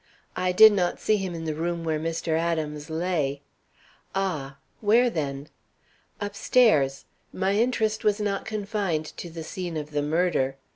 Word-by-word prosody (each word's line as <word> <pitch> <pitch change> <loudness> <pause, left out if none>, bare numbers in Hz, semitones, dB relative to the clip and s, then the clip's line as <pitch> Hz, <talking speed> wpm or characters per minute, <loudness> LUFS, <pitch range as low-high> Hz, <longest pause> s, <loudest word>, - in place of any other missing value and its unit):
"I 185 0 0
did 215 +4 +8
not 180 -3 0
see 215 - +2
him 190 -3 -4
in 165 -1 -5
the 155 - -1
room 170 +2 -2
where 160 -2 -1
Mr. 165 +1 -3
Adams 160 -2 -1
lay." 160 -4 -1 0.7
"Ah! 150 -8 -2 0.2
Where, 235 +3 +4
then?" 140 -3 -4 0.7
"Upstairs. 205 - +2 0.3
My 190 +1 0
interest 220 -1 +1
was 210 0 +2
not 200 -2 -1
confined 200 -6 -2
to 175 - -6
the 165 0 -7
scene 175 0 -5
of 150 0 -5
the 145 -1 0
murder. 150 -3 +1
170 Hz, 150 wpm, -26 LUFS, 155-205 Hz, 0.7 s, did